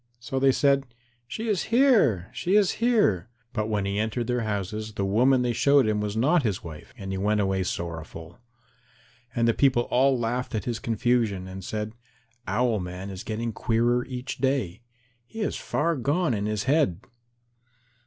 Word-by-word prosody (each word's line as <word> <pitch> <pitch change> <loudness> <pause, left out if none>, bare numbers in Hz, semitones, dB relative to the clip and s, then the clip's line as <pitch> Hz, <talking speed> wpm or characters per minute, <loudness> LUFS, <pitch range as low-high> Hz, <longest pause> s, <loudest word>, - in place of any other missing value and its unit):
So 130 +2 -3
they 135 0 +5
said, 140 0 +2 0.4
"She 225 - -5
is 205 -5 0
here, 225 - +3
she 185 +3 0
is 205 -3 +4
here." 205 - +2 0.2
But 110 -1 -1
when 105 -2 0
he 100 +1 -1
entered 110 +2 -1
their 125 0 -1
houses, 105 0 -3
the 100 -2 -2
woman 125 +6 +3
they 120 -1 0
showed 140 +2 +4
him 105 -1 0
was 105 +1 -3
not 150 +9 +3
his 105 -8 -2
wife, 80 -3 -10
and 95 -1 -6
he 95 - -3
went 105 +2 +1
away 95 -1 +1
sorrowful. 85 -1 -6 1.0
And 115 -1 +2
the 115 - +4
people 130 -2 +3
all 130 +1 +4
laughed 120 +1 -2
at 110 - -2
his 120 -2 -2
confusion, 115 -5 0
and 95 0 -8
said, 105 +2 -4 0.5
"Owl 110 +2 +1
man 90 +2 -6
is 95 +1 -7
getting 115 +1 -3
queerer 120 +2 +1
each 125 +1 -6
day. 130 -8 -1 0.5
He 225 - -7
is 210 - -1
far 165 +2 -1
gone 145 +2 0
in 105 -1 -1
his 105 -2 -1
head." 130 - +2
115 Hz, 175 wpm, -26 LUFS, 100-135 Hz, 1.0 s, they